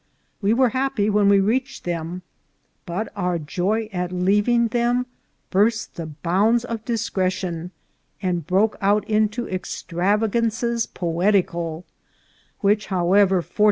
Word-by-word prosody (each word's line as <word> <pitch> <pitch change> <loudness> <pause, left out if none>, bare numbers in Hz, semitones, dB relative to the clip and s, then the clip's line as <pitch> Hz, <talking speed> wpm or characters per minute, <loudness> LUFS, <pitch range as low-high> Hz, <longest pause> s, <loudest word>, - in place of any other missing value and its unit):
We 200 +1 +2
were 250 +2 +4
happy 255 -5 0
when 205 -1 +4
we 200 0 +6
reached 255 +7 -1
them, 175 +1 -4 0.6
but 185 +6 -4
our 180 -3 0
joy 185 +8 -1
at 180 -1 -2
leaving 205 +6 +2
them 240 +1 +1 0.5
burst 220 +4 +1
the 165 -2 -6
bounds 190 +10 +1
of 230 -2 -5
discretion, 185 -6 -2 0.5
and 175 -4 -2
broke 205 +4 +2
out 205 +2 +2
into 215 +2 +1
extravagances 220 +6 -1
poetical, 175 -1 0 0.8
which, 210 0 +2
however, 180 -2 0
fortu 205 - +7
AN 200 -2 +5
ACCIDENT 185 -2 +1
ON - - -32
THE - - -24
ROAD. - - -23
200 Hz, 140 wpm, -22 LUFS, 180-225 Hz, 0.8 s, fortu